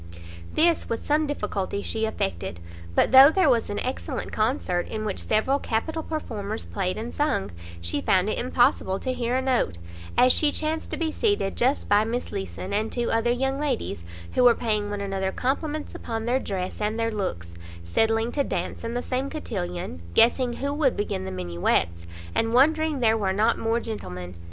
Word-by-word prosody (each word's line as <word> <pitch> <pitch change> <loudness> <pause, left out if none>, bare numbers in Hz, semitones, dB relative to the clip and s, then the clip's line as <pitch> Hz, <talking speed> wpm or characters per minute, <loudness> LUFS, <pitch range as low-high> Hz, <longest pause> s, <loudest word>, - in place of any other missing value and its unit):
This, 335 +1 +2
with 230 - -3
some 300 +1 +2
difficulty, 205 -7 -2
she 220 0 -1
effected; 90 - -3 0.4
but - - +3
though 265 +2 +10
there 320 -3 +4
was 230 -2 +1
an 205 - -3
excellent 255 +1 -3
concert, 215 -6 0
in 215 -1 -4
which 205 - -2
several 260 +6 +1
capital 315 +9 -2
performers 225 -10 -4
played 185 -2 -2
and 230 +2 -5
sung, 290 -10 0 0.3
she 85 +12 -1
found 185 +1 +3
it 215 - -1
impossible 240 -6 +2
to 255 +5 -2
hear 245 0 -1
a 260 - +1
note, 255 - +1 0.4
as 255 0 +6
she 300 -2 +3
chanced 315 +1 -2
to - - -3
be 325 -1 -1
seated 405 - 0
just 260 +4 +1
by 205 +1 +4
Miss 235 +3 -3
Leeson, 95 - -5
and 215 +2 0
two 240 -1 -1
other 225 +1 +2
young 265 +3 0
ladies, 250 - -2 0.3
who 250 - +3
were 240 -1 +7
paying 215 -3 -1
one 205 0 -3
another 195 -1 -1
compliments 295 +6 -2
upon 225 -1 -4
their 250 +2 +2
dress 190 -3 -4
and 215 +2 -1
their 225 0 +1
looks, 85 - -4 0.3
settling 225 - +1
to 285 - +1
dance - - -3
in 230 +1 -3
the 245 - -1
same 260 +2 -2
cotillon, 180 - -4
guessing 245 +1 +4
who 280 +3 -2
would 290 -4 +1
begin 95 - -2
the 95 - -4
minuets, 85 -1 -1 0.3
and 225 +1 +1
wondering 310 +1 +3
there 225 -1 +4
were 190 -2 +1
not 220 +4 +2
more 225 +1 +1
gentlemen. 90 - -6
225 Hz, 185 wpm, -25 LUFS, 195-265 Hz, 0.4 s, though